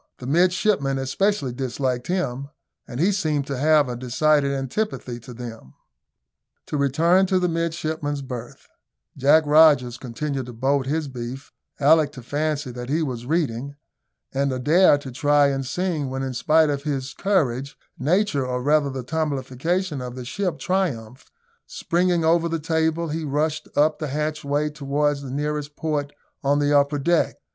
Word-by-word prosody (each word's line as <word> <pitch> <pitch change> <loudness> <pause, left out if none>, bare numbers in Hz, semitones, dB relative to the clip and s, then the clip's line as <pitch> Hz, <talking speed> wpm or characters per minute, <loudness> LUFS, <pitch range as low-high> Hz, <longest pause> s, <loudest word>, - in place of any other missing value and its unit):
The 125 - -9
midshipmen 175 - +2
especially 135 +2 0
disliked 130 -1 -2
him, 140 -7 -2 0.4
and 120 - -7
he 185 +6 +3
seemed 155 -7 0
to 140 -1 -4
have 150 -1 +4
a 125 - -4
decided 140 +4 +2
antipathy 135 - -3
to 125 +2 -12
them. 115 - -9 0.9
To - - -5
return 165 +7 +3
to 185 0 +2
the 180 -1 +1
midshipmen's 160 -4 -2
berth: 125 -2 -8 0.5
Jack 145 +4 +5
Rogers 145 -6 +5
continued 135 +1 -4
to 125 - -8
bolt 135 +3 0
his 155 +1 -1
beef, 130 +1 -7 0.3
Alick 150 +1 +4
to 125 - -10
fancy 145 0 -2
that 120 +1 -7
he 160 +3 +1
was 125 -4 -5
reading, 140 -4 -1 0.6
and 140 0 0
Adair 150 +6 +4
to 140 -2 -8
try 145 +2 +3
and 135 -1 -2
sing, 155 0 -2
when, 135 +1 -3
in 130 -1 -3
spite 155 +4 +3
of 140 -1 -2
his 135 -3 -3
courage, 140 -9 0 0.2
nature, 160 0 +1
or 125 0 -2
rather 145 0 +3
the 130 -1 -5
tumblification 150 +3 -2
of 125 0 -6
the 125 -1 -7
ship, 180 +4 -2
triumphed; 130 - -2 0.4
springing 180 - 0
over 170 +1 +3
the 165 - -1
table, 160 +1 0
he 160 +2 -3
rushed 150 +2 -1
up 150 +1 +3
the 155 - -3
hatchway 150 0 -1
towards 145 0 -1
the 135 - -7
nearest 145 +1 -3
port 150 -3 -2 0.3
on 140 +1 +2
the 145 0 +2
upper 145 +1 +3
deck. 165 +4 +1
145 Hz, 160 wpm, -23 LUFS, 130-160 Hz, 0.9 s, Jack